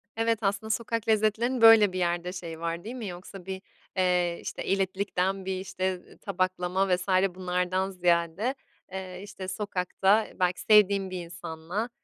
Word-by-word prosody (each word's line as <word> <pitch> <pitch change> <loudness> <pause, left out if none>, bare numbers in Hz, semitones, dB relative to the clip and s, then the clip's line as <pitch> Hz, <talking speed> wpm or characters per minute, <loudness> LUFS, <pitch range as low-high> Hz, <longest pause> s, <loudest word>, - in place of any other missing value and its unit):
Evet, 225 -1 +1
aslında 205 +2 -1
sokak 230 0 -1
lezzetlerinin 220 +3 +2
böyle 220 -4 +8
bir 185 - -2
yerde 175 +1 -1
şeyi 165 -3 -7
var, 170 +1 -3
değil 235 +4 -6
mi? 235 -5 -5
Yoksa 180 +1 -9
bir, 190 0 -5 0.4
eee, 180 -2 +2
işte, - - -5
elitlikten 195 0 -1
bir, 190 -1 -2
işte, 185 -1 -2
eee, - - -17
tabaklama 185 0 0
vs. 180 +2 -7 0.3
bunlardan 185 +1 -1
ziyade, 175 +6 +1 0.4
eee, 185 -1 -6
işte, 200 -2 -8
sokakta, 195 +2 +1
belki 180 0 +1
sevdiğin 200 -3 +5
bir 185 -1 -4
insanla, 175 +6 -5
190 Hz, 150 wpm, -28 LUFS, 180-205 Hz, 0.4 s, böyle